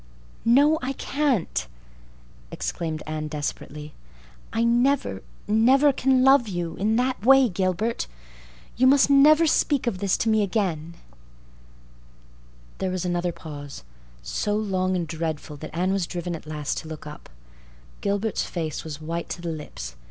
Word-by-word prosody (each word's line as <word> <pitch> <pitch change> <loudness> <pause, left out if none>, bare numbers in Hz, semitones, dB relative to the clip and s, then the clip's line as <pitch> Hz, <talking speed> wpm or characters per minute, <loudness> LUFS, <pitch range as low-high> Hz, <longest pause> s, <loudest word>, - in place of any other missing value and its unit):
"No, 285 +7 +5
I 265 +1 -2
can't," 270 - -1 0.8
exclaimed 160 - -4
Anne 155 0 -4
desperately. 150 0 -5 0.6
"I 225 - 0
never, 240 - +2 0.3
never 260 +7 +4
can 260 0 +2
love 270 -3 +5
you—in 185 +3 -1
that 250 -2 0
way—Gilbert. 225 -5 +3 0.7
You 255 +2 +4
must 280 +1 +5
never 300 +4 +6
speak 290 -3 +2
of 200 -6 -1
this 195 -1 +1
to 225 - 0
me 220 -1 +3
again." 180 -5 -1 1.8
There 190 - -1
was 185 -1 -3
another 175 0 0
pause—so 140 - -6
long 185 -3 0
and 175 -2 -2
so 165 - -6
dreadful 155 -2 -3
that 155 +2 -8
Anne 185 +2 +1
was 190 -3 -1
driven 175 -1 -4
at 155 - -10
last 150 -2 -3
to - - -10
look 155 -1 -8
up. 150 0 -10 0.7
Gilbert's 200 +2 -1
face 160 -4 -4
was 155 -2 -7
white 165 +2 -4
to 175 - -5
the 170 - -2
lips. 65 - -7
185 Hz, 140 wpm, -25 LUFS, 155-240 Hz, 1.8 s, never